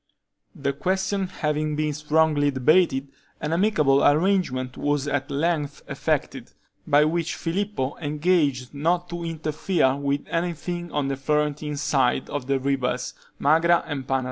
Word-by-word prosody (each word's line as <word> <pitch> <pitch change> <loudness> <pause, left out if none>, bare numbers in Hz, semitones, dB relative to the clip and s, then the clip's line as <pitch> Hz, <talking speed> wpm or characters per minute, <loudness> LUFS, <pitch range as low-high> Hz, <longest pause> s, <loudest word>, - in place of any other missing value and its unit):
The 140 0 -2
question 190 +5 -1
having 150 -3 -2
been 150 0 -1
strongly 150 0 +2
debated, 140 0 +2 0.3
an 150 +2 -2
amicable 155 -8 +3
arrangement 145 -6 +2
was 145 -1 -1
at 145 -1 -1
length 150 0 -1
effected, - - -2 0.3
by 145 +1 +5
which 165 +1 -1
Filippo 175 -5 -2
engaged 150 -4 0
not 170 +5 0
to 170 0 -4
interfere 160 -2 0
with 140 0 -2
anything 175 0 -3
on 145 -2 -1
the 135 -1 -2
Florentine 150 +1 -1
side 135 -3 +1
of 140 -3 -4
the 135 -1 +1
rivers 130 -2 -1 0.2
Magra 165 +4 +3
and 140 -4 -5
Panaro. 135 0 +1
150 Hz, 135 wpm, -24 LUFS, 140-170 Hz, 0.3 s, by